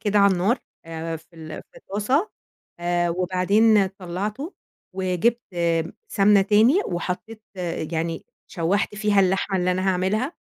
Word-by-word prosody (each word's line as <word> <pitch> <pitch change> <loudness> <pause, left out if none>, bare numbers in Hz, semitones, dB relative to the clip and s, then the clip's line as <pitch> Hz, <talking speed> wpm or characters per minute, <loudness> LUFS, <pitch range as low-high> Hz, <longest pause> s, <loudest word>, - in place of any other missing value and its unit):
كده 205 0 +1
على 200 -1 +6
النار 190 +8 +1 0.3
آآ 165 0 -5
في 165 +1 -19
ال 155 -1 -8
في - - -21
الطاسة، 260 - 0 0.5
آآ 175 0 +1
وبعدين 190 +4 +3
طلّعته 200 - -5 0.4
وجبت 190 +5 +1
آمم، 170 -1 0 0.2
سَمنة 200 0 +4
تاني، 220 - +4
وحطيت 190 +5 -4 0.5
يعني 165 0 -2 0.2
شوّحت 195 +4 -1
فيها 205 -1 +2
اللحمة 190 +1 +1
اللي 180 0 +1
أنا 185 +1 0
هاعملها، 195 - 0
190 Hz, 130 wpm, -23 LUFS, 175-210 Hz, 0.5 s, على